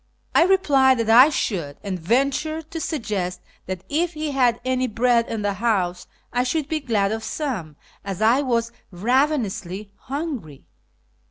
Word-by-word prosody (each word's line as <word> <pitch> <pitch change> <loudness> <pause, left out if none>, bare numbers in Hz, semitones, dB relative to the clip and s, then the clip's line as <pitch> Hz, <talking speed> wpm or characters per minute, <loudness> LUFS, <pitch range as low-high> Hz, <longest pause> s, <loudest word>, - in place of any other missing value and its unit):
I 330 - +6
replied 280 -9 +4
that 225 -1 +1
I 250 +6 +8
should, 170 - -2
and 190 -3 -3
ventured 275 - 0
to 325 - -4
suggest 210 - -3 0.3
that 185 -1 -5
if 335 +4 0
he 305 -1 -3
had 250 -4 +2
any 255 0 +1
bread 235 +1 +2
in 220 -2 -3
the 205 -1 0
house 185 -4 -1 0.3
I 245 - +2
should 280 +3 -1
be 315 0 -1
glad 215 -8 0
of 220 0 -3
some, 220 - -4 0.3
as 195 -3 -5
I 230 +5 +4
was 235 -4 0 0.2
ravenously 215 - -1
hungry. 265 - -6
235 Hz, 155 wpm, -23 LUFS, 200-280 Hz, 0.3 s, I